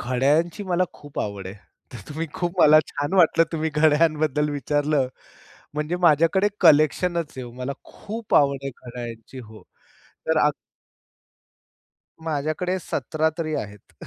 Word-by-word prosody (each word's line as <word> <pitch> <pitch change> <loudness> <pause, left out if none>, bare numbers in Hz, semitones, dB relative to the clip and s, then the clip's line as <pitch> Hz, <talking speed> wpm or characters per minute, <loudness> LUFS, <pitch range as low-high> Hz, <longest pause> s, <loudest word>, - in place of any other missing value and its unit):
घड्याळयांची 145 - +1
मला 185 -1 +1
खूप 145 -1 -11
आवड 100 -2 -5
आहे. 95 - -7 0.4
तर 120 - -8
तुम्ही 160 +3 -4
खूप 175 0 -2
मला 155 +1 +8
छान 145 +3 -4
वाटलं 165 -2 +5
तुम्ही 160 -1 -1
घड्याळयांबद्दल 150 -1 +2
विचारलं 145 0 0 0.7
म्हणजे 150 +3 -2
माझ्याकडे 170 +5 +4
कलेक्शनच 165 +1 +3
आहे. 130 - -5
मला 130 +2 -4
खूप 220 0 -6
आवड 140 -1 +4
आहे 135 - -4
घड्याळयांची 120 -1 -9
हो. 110 -3 -12 0.6
तर 160 - +1
आ, 150 - +4 1.8
माझ्याकडे 155 +4 -1
17 160 -1 -1
तरी 155 -2 -2
आहेत. 105 -6 -7
150 Hz, 130 wpm, -23 LUFS, 135-165 Hz, 1.8 s, मला